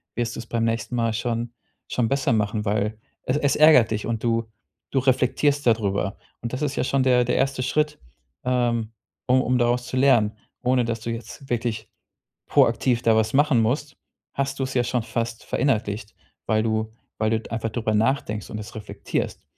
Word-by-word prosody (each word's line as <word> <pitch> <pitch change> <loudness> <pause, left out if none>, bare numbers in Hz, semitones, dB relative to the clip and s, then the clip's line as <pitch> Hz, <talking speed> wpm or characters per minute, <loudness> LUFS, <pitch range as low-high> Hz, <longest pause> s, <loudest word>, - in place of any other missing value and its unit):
wirst 120 -1 -2
du - - -6
es 115 - -8
beim 115 0 -1
nächsten 115 +2 -1
Mal 115 -1 +1
schon 115 +1 -2 0.4
schon 120 -2 +1
besser 135 0 +1
machen, 105 0 0
weil 105 +1 0 0.3
es - - 0
es 145 -2 +2
ärgert 150 -7 +7
dich 105 -1 -2
und 115 -1 -2
du 115 -1 +1 0.5
du 135 - +2
reflektierst 135 +2 +2
da 115 - +7
drüber. 100 -2 -2 0.3
Und 120 +1 -5
das 130 - -3
ist 145 -1 -1
ja - - +1
schon 135 0 +1
der 125 -1 +4
der 125 - 0
1. 135 -1 0
Schritt, 150 +3 0 0.5
ähm, 120 -3 +1 0.4
um 130 +1 +4
um 125 0 +1
daraus 120 +1 +1
zu 130 - -3
lernen. 120 -6 +4 0.3
Ohne, 125 -1 +2
dass 115 -1 -3
du 115 - -4
jetzt 120 +4 -8
wirklich 115 -2 -2 0.6
proaktiv 120 +1 +3
da 115 -1 +4
was 110 0 +1
machen 145 -2 +4
musst, 135 +4 -1 0.4
hast 140 0 -2
du - - +1
es 130 0 -3
ja 125 - +3
schon 125 0 0
fast 115 0 -3
verinnerlicht, 110 -5 -1 0.3
weil 110 +1 +2
du 110 0 -1 0.3
weil 110 0 +1
du - - -13
einfach 115 0 -2
darüber 110 -1 -1
nachdenkst 110 -2 0
und 110 - -5
das 110 +3 -8
reflektierst. 105 -1 -4
120 Hz, 195 wpm, -24 LUFS, 110-130 Hz, 0.6 s, ärgert